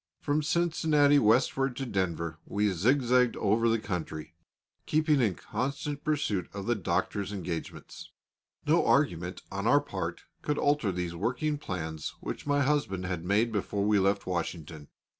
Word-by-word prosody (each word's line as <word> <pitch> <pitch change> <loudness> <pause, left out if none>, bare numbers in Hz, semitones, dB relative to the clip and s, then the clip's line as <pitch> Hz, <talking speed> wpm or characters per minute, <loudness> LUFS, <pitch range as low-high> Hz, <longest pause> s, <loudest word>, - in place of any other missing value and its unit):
From 145 +1 0
Cincinnati 155 -3 +3
westward 125 +3 +2
to 135 - -3
Denver, 85 -7 -2
we 105 0 +1
zigzagged 125 +5 +3
over 115 +3 +2
the 115 - +3
country, 80 -6 -5 0.5
keeping 155 -2 +3
in 105 -7 +2
constant 140 - -4
pursuit 140 -11 -1
of 100 -1 -5
the 120 - +2
Doctor's 100 0 -1
engagements. 90 -5 -6 0.6
No - - +4
argument - - +1
on - - -2
our - - +6
part - - -5 0.2
could 150 0 -1
alter 145 -8 +2
these 90 -1 -3
working 145 - -1
plans 80 - -5
which - - -6
my 145 0 +3
husband 130 -10 0
had 90 -3 -3
made 105 +6 +2
before 100 -1 -1
we 105 -1 +4
left 100 +1 +1
Washington. 85 -4 -4
105 Hz, 145 wpm, -29 LUFS, 90-140 Hz, 0.6 s, our